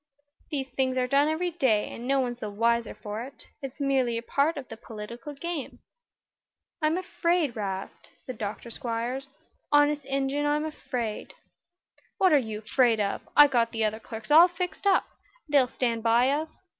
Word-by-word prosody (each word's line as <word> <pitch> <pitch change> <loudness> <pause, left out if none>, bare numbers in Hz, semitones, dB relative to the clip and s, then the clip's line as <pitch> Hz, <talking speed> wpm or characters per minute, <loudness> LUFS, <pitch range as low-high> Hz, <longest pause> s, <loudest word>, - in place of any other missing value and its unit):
"These 270 -3 -3
things 260 0 0
are 255 - +2
done 280 +3 +3
every 340 +3 0
day, 260 -11 +1
and 240 - -7
no 275 0 +3
one's 245 -2 -2
the 215 - -4
wiser 230 +2 0
for 210 +1 -6
it. 270 +3 -9 0.2
It's 270 +1 -7
merely 265 -4 +1
a 230 - -4
part 285 +6 +1
of 270 -3 -6
the 225 - -8
political 235 +6 -8
game." 330 -1 -5 1.0
"I'm 310 +2 +2
afraid, 345 -6 0
'Rast," 195 -3 -5 0.2
said 255 -4 -7
Dr. 215 +3 -5
Squiers. 245 +3 -3 0.4
"Honest 290 -1 +4
Injun, 275 +2 0
I'm 300 +1 +1
afraid." 245 -8 -4 0.8
"What 375 -4 +4
are 295 - +7
you 220 -4 -5
'fraid 230 0 +3
of? 200 -1 -1 0.2
I've 295 -1 +9
got 235 -2 +2
the 225 -1 0
other 215 +1 -1
clerks 225 +2 -8
all 330 +4 +9
fixed, 360 +1 -4
and 385 - +5 0.4
they'll 285 -4 +4
stand 235 -2 -1
by 235 +3 +4
us. 310 +2 -3
260 Hz, 170 wpm, -27 LUFS, 230-295 Hz, 1.0 s, I've